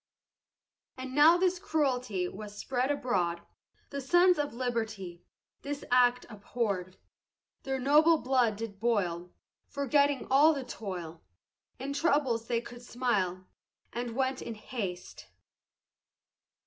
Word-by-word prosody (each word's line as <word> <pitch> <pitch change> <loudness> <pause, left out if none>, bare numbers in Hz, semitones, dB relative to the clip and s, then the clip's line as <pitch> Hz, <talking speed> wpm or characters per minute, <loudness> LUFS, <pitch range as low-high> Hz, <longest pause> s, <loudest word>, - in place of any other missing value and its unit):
And 260 0 -6
now 305 +5 +7
this 365 0 +1
cruelty 255 - -1
Was 205 +2 -9
spread 255 +3 -1
abroad, 180 -12 0 0.5
The 280 - -4
sons 350 +5 +4
of 290 0 -1
liberty 220 -8 -4 0.4
This 285 0 -5
act 250 0 +4
abhorr'd, 200 -4 -3 0.6
Their 270 0 -2
noble 300 +5 +5
blood 250 -6 +1
did 205 -2 -7
boil, 180 -6 -1 0.4
Forgetting 280 0 +1
all 300 +4 +6
the 275 - -4
toil, 175 -9 -7 0.6
In 275 +2 -4
troubles 280 -7 +1
they 235 -1 0
could 240 0 -11
smile, 205 -8 -1 0.5
And 240 -1 -4
went 260 0 -1
in 230 - -6
haste. 200 -5 -6
245 Hz, 115 wpm, -30 LUFS, 205-280 Hz, 0.6 s, now